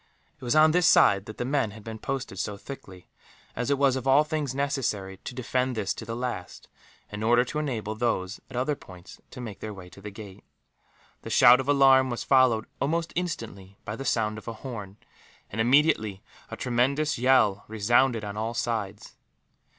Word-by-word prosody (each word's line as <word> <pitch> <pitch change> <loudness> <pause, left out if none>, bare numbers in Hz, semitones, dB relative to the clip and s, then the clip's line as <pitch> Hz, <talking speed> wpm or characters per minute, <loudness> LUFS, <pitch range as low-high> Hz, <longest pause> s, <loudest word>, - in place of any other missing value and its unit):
It - - -19
was 125 +4 0
on 155 0 +6
this 180 +1 +3
side 100 0 +5
that 110 - -9
the 125 - -3
men 135 -4 0
had 105 +1 -12
been 110 0 -7
posted 130 -6 -4
so 105 - -3
thickly, 100 -7 -11 0.5
as 125 +2 -2
it 140 - +2
was 135 -2 +3
of 130 0 -4
all 135 +3 +6
things 150 -4 -3
necessary 115 -9 -2
to 125 - -9
defend 125 0 -1
this 105 -3 -1
to 110 - -8
the 115 +1 -5
last, 120 -7 -5 0.4
in 105 0 -6
order 120 +3 +3
to 150 - -4
enable 115 -8 -3
those 110 -4 -2
at 130 - -10
other 130 +4 0
points 90 -7 -14
to - - -11
make 110 -5 -7
their 105 -1 -6
way 90 -2 -11
to 95 +3 -15
the 105 - -7
gate. 100 -2 -11 0.8
The - - -8
shout 120 +3 +7
of 135 +1 -3
alarm 135 -2 +5
was 120 - -3
followed, 130 -5 +3
almost 165 +4 -1
instantly, 105 - -5
by 105 -1 -4
the 135 - -6
sound 110 -4 0
of - - -18
a 115 - -4
horn 105 -5 -8 0.5
and, 110 - -1
immediately, 120 -6 +2 0.3
a - - -7
tremendous 135 +4 0
yell 125 -6 +3
resounded 115 +2 +2
on 100 0 -5
all 110 +2 -3
sides. 110 -4 -4
120 Hz, 195 wpm, -26 LUFS, 105-135 Hz, 0.8 s, shout